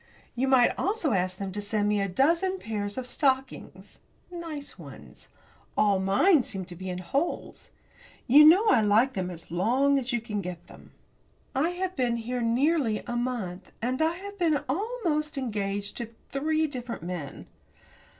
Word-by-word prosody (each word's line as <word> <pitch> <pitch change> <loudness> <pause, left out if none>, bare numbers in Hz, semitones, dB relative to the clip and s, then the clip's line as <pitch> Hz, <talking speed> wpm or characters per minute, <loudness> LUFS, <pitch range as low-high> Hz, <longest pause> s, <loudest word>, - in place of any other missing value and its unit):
You 260 +2 0
might 260 -2 +5
also 385 -6 0
ask 185 -1 0
them 195 -1 -4
to 205 +2 -4
send 205 0 -1
me 210 -1 +1
a 195 - 0
dozen 335 - +2
pairs 205 - -4
of 260 - -3
stockings 265 +1 -2 0.3
nice 330 -5 -7
ones. - - -12 0.5
All 200 -2 +3
mine 255 - +4
seem 200 -8 -5
to 175 -1 -10
be 185 +2 -6
in 180 - -3
holes. 275 - -3 0.6
You 285 +5 +8
know 350 +8 +7
I 230 - +5
like 220 +6 +3
them 185 -2 -2
as 170 -2 -9
long 255 +10 +2
as 265 0 -4
you 240 - +1
can 210 -2 -4
get 180 -2 -7
them. - - -15 0.6
I 290 +6 +1
have 370 0 -2
been 245 -3 0
here 245 +2 -3
nearly 245 0 +1
a 240 - -4
month, 235 -7 -3
and 255 +5 -1
I 320 +1 +2
have 400 +3 -9
been 315 -5 +2
almost 320 - -1
engaged 205 -5 -3
to 235 -2 -4 0.2
three 310 +3 +1
different 250 - -6
men. 170 -5 -6
245 Hz, 170 wpm, -27 LUFS, 205-305 Hz, 0.6 s, You